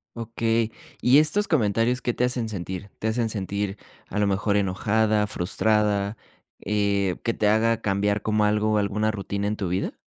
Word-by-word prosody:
Okey, 115 0 -1 0.3
¿y 130 +4 +6
estos 175 +7 +2
comentarios 115 - +1
qué 120 - -1
te - - 0
hacen 125 -3 0
sentir? 95 0 -6
¿Te 110 - -3
hacen 115 +1 0
sentir, 100 -1 -3 0.3
a 105 - -5
lo 105 - +3
mejor 100 +1 +1
enojada, 105 +2 +1
frustrada, 105 +2 0 0.5
eh, 100 -2 +1
que 115 - 0
te 105 - +1
haga 110 +2 +3
cambiar 100 +1 0
como 110 -1 +1
algo, 105 0 +2
alguna 105 +2 0
rutina 100 -1 -4
en 105 - -1
tu 95 -4 -3
vida? 90 +2 -2
105 Hz, 165 wpm, -25 LUFS, 100-115 Hz, 0.5 s, y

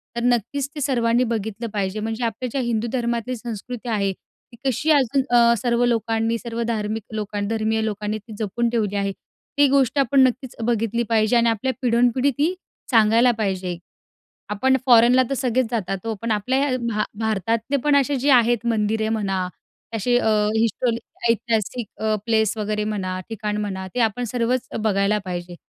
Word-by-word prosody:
तर 235 - -2
नक्कीच 245 +3 0
ते 295 - -5
सर्वांनी 240 -2 +2
बघितलं 225 -1 -3
पाहिजे 200 0 -2
म्हणजे. 225 +2 -3
आपल्या 235 +3 -3
ज्या 270 - -1
हिंदू 235 -1 -1
धर्मातली 240 0 -1
संस्कृती 240 +1 -6
आहे 200 -3 +1
ती 235 +5 -23
कशी 270 +4 0
अजून 275 -2 +3
अ, 235 0 +6
सर्व 235 +2 +1
लोकांनी 225 -1 0
सर्व 235 0 -5
धार्मिक 220 -1 -2
लोकांन 205 -1 -3
धर्मीय 220 0 0
लोकांनी 210 0 -2
ती 215 +1 -12
जपून 230 +3 -1
ठेवली 215 -4 -1
आहे, 200 0 0 0.5
ती 285 0 +6
गोष्ट 275 -1 +2
आपण 275 +1 +3
नक्कीच 255 0 -5
बघितली 230 0 0
पाहिजे 220 +1 +3
आणि 235 0 +4
आपल्या 240 +4 -1
पिढोनपिढी 245 +2 +2
ती 315 +5 +2 0.4
सांगायला 230 +1 +5
पाहिजे. 185 -4 -2 0.7
आपण 265 +6 +2
फॉरेनला 245 +1 +6
तर - - 0
सगळेच 255 -1 +1
जातात 195 -4 -3
हो, 225 - -1
पण 230 0 -2
आपल्या 220 +6 +1
या 275 -2 +1
भा 210 -2 0 0.2
भारतातले 225 +4 0
पण 295 -1 +3
असे 280 0 +2
जे 280 +4 +1
आहेत 240 -2 +4
मंदिरे 220 -1 0
म्हणा, 195 -4 -1 0.5
असे 245 +3 +2
अ, 235 - +1 0.3
हिस्टो 230 +2 +1 0.4
ऐतिहासिक 230 0 0 0.4
प्लेस 220 -2 +2
वगैरे 210 0 -1
म्हणा, 190 -3 -3
ठिकाण 210 -2 -3
म्हणा 190 -2 -4
ते 250 - 0
आपण 245 +4 -6
सर्वच 245 +1 0 0.2
बघायला 200 0 +2
पाहिजे. 175 -1 -5
230 Hz, 165 wpm, -22 LUFS, 210-245 Hz, 0.7 s, अ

